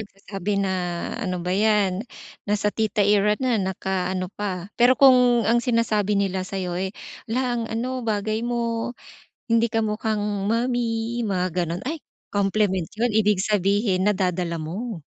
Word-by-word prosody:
nagsasabi 200 -1 -4
na, 195 -1 0 0.5
"Ano 185 -4 -2
ba 180 - -1
yan, 205 -2 +2 0.5
nasa 210 0 +1
tita 220 -1 +1
era 210 0 +4
na 255 -3 +2
naka-ano 185 -1 -2
pa." 190 -3 -4
Pero 245 +2 +6
kung 250 -3 +6
ang 235 +1 +4
sinasabi 220 -4 +1
nila 190 -1 0
sayo, 185 -3 -3
eh,"Hala 215 +5 -4 0.2
ang 235 - -1
ano, 250 +3 -2
bagay 215 +1 -1
mo 235 -1 -1 0.6
hindi 230 0 +3
ka 225 - +2
mukhang 210 -2 -1
mommy," 235 0 0
mga 185 -3 0 0.2
ganon 170 +2 -4
ay 320 +1 -4 0.3
compliment 195 -3 +1
yun 235 0 +1
ibig 210 -3 +3
sabihin 200 -1 +1
nadadala 180 -4 0
mo. 185 +2 -5
210 Hz, 140 wpm, -24 LUFS, 190-230 Hz, 0.6 s, Pero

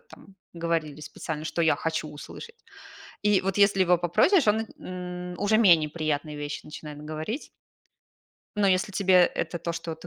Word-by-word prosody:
там 335 - -17 0.2
говорили 165 -3 -2
специально, 155 0 -6
что 170 +1 -1
я 160 - +4
хочу 160 -1 -3
услышать. 460 - -11 0.6
И 210 -2 +3
вот, 195 +1 -2
если 200 -1 +4
его 180 -1 +4
попросишь, 215 - +3
он 210 +1 +4 0.2
на - - -16 0.5
н 175 - -9
уже 210 +2 +3
менее 170 -8 +5
приятные 155 -1 -2
вещи 145 +1 -5
начинает 150 -1 -9
говорить. 155 - -5 1.1
Но 205 - +3
если 190 +3 +1
тебе 190 -1 +2
это 175 - -3
то, 170 +1 -3
что 165 -1 -5
ты 170 - -12
170 Hz, 165 wpm, -26 LUFS, 155-200 Hz, 1.1 s, менее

